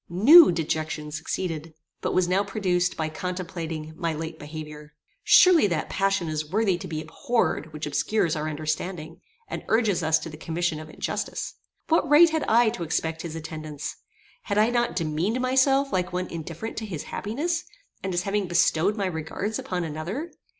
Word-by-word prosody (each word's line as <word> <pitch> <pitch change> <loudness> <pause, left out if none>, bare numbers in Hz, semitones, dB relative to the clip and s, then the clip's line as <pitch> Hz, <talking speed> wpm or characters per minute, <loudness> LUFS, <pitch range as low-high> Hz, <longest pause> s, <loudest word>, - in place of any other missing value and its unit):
New 250 - +8
dejection 155 -2 -2
succeeded, 160 0 -4 0.3
but - - -1
was 185 -1 +3
now 190 +3 +2
produced 180 -3 0
by 160 - -1
contemplating 165 -2 -5
my 165 -2 -2
late 160 +1 -6
behaviour. 150 0 -9 0.3
Surely 355 - +7
that 165 -5 -2
passion 195 -3 +1
is 155 -1 -3
worthy 205 -2 +2
to 185 +2 -7
be 155 -2 -4
abhorred 160 - -1
which 150 0 -5
obscures 165 +4 0
our 155 0 -2
understanding, 155 +2 -4 0.3
and - - -5
urges 215 -5 +2
us 160 0 +3
to 155 - -7
the 155 -1 -9
commission 165 0 -2
of 155 0 -9
injustice. - - -4 0.3
What 325 -2 +2
right 320 +3 +7
had 320 -1 0
I 235 +1 +5
to 215 -5 -6
expect 160 0 -2
his 165 -2 -6
attendance? 155 -2 -6 0.5
Had 205 - -1
I 215 +3 +4
not 240 -1 0
demeaned 170 +7 -1
myself 265 +2 +3
like 180 -1 0
one 180 +1 -2
indifferent 170 +6 -6
to 220 - -3
his 165 -7 -5
happiness, 325 +11 -2 0.4
and 190 - -3
as 175 0 0
having 200 -1 -1
bestowed 170 +3 +2
my 200 - 0
regards 185 +5 -3
upon 180 -1 -3
another? 170 - -4
175 Hz, 170 wpm, -25 LUFS, 155-210 Hz, 0.5 s, New